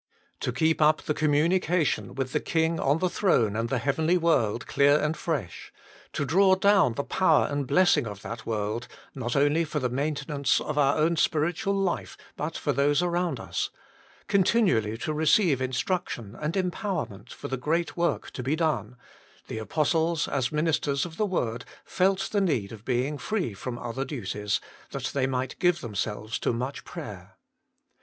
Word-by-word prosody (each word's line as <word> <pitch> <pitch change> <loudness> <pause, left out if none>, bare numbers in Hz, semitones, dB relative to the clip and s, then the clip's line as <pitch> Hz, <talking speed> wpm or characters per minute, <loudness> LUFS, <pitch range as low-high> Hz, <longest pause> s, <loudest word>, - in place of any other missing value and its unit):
To - - -1
keep 160 +6 +1
up 155 0 +4
the 150 - 0
com 155 0 +1
munication 165 +2 +1
with 135 -1 -3
the - - +2
King 165 0 0
on 140 +3 +2
the 185 - +1
throne 125 - +2
and 115 +1 -1
the 135 - +1
heavenly 155 +8 +1
world 120 -10 +1
clear 145 +1 +4
and 155 +1 0
fresh; 140 - -4 0.4
to - - -1
draw 190 +6 +5
down 195 - +4
the 140 - -2
power 165 -2 +3
and 145 -2 -2
blessing 160 -5 +4
of 105 -1 -8
that 115 -1 -6
world, 110 +1 -2 0.3
not 125 -3 -3
only 145 +4 +3
for 155 -1 -4
the 125 -4 -1
maintenance 140 0 0
of 150 - -4
our 140 -1 +3
own 165 +2 +2
spiritual 165 +6 +1
life, 175 - -2 0.2
but - - -4
for - - -1
those 145 +4 +2
around 175 0 0
us; - - -3 0.6
continually 185 - +2
to 155 - -3
receive 155 - +3
instruction 130 - -2
and 155 +4 -2
empowerment 180 - -3
for - - -7
the 135 - -2
great 160 +6 -1
work 170 0 -1
to - - -6
be 135 +5 0
done 130 - -1 0.5
the 110 - -4
apostles, 160 +6 +1
as 130 -3 0
the - - -7
ministers 150 -2 +1
of 165 -1 -9
the 215 - +1
word, 120 - -2 0.2
felt 195 +1 +1
the 205 - +2
need 130 - 0
of 110 -2 -10
being 130 +4 -1
free 200 - -2
from 120 +5 -5
other 120 +2 -4
duties, 105 -7 -2 0.3
that - - -4
they 130 -2 +1
might 130 0 -3
give 175 -1 +3
themselves 105 -1 -3
to - - 0
much 125 +4 -4
prayer. - - -9
145 Hz, 175 wpm, -27 LUFS, 125-170 Hz, 0.6 s, draw